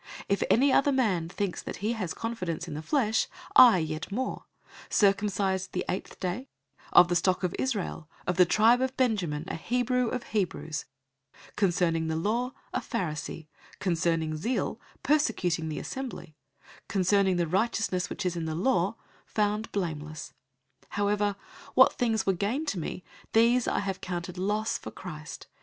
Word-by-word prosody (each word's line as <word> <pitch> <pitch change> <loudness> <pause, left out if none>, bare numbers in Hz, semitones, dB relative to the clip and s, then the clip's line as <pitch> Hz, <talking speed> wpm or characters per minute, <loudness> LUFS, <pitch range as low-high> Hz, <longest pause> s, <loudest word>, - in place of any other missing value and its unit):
If 200 - +1
any 265 +3 +4
other 285 +1 +4
man 200 -11 +1
thinks 195 0 -3
that - - -6
he 215 +4 -1
has 190 -8 -3
confidence 180 -7 -3
in 160 - -5
the 150 - -4
flesh, 225 - +1 0.3
I 240 -6 +9
yet 160 +1 -3
more: 255 +5 -3 0.4
003:005 - - -11
circumcised 195 -2 +2
the 180 - -2
eighth 185 - -4
day, 195 +9 -3 0.4
of 175 - +8
the 175 - 0
stock 185 +2 +2
of 180 - 0
Israel, 200 - -2 0.2
of 180 - -1
the 185 - +8
tribe 230 +6 +5
of 260 0 -1
Benjamin, 185 - 0
a - - -4
Hebrew 250 +6 0
of 245 +1 -3
Hebrews; 180 -6 -2 0.7
concerning 170 -4 +1
the 160 - -1
law, 235 +9 0 0.2
a - - +1
Pharisee; 165 - -4 0.3
003:006 - - -21
concerning 165 -3 0
zeal, 230 +11 -2 0.2
persecuting 180 - +1
the 155 - -4
assembly; 245 - -6 0.5
concerning 195 0 +3
the 175 -1 +1
righteousness 190 0 0
which 210 - -4
is 180 -1 0
in 165 -1 -3
the 160 -1 -2
law, 185 +1 +1 0.3
found 210 +1 0
blameless. 155 -5 -4 0.5
003:007 - - -32
However, 205 0 +1 0.4
what 260 - +7
things 225 -2 0
were 195 - +3
gain 220 - -1
to 210 - -2
me, 170 +3 -5 0.3
these 235 +2 +4
have 195 -1 -1
I - - -31
counted 180 0 -5
loss 210 +3 0
for - - -7
Christ. 155 -4 -8
195 Hz, 165 wpm, -28 LUFS, 170-225 Hz, 0.7 s, I